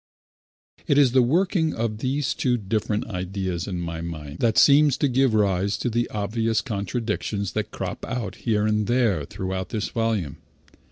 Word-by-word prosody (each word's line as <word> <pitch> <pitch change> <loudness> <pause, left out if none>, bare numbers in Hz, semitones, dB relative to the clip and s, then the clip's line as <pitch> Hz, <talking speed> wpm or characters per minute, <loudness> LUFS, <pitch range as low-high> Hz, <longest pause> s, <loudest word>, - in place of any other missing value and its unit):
It 145 - +3
is 140 -4 +5
the 130 +1 +5
working 160 +4 +1
of 110 -2 -2
these 135 +3 0
two 125 -2 +1
different 105 0 -1
ideas 95 -2 -3
in 90 -3 -3
my 85 -1 -4
mind 80 -4 -7
that 115 -2 +2
seems 145 -1 +6
to 145 - +2
give 130 -2 +2
rise 100 -1 +1
to 125 - -2
the 120 +1 0
obvious 110 +2 0
contradictions 105 -1 -3
that - - -2
crop - - -5
out 120 -4 -3
here 105 -3 0
and 105 -1 +1
there 115 - +2
throughout 95 +3 -4
this 110 -2 -2
volume. 110 -10 -1
110 Hz, 165 wpm, -24 LUFS, 95-125 Hz, -, seems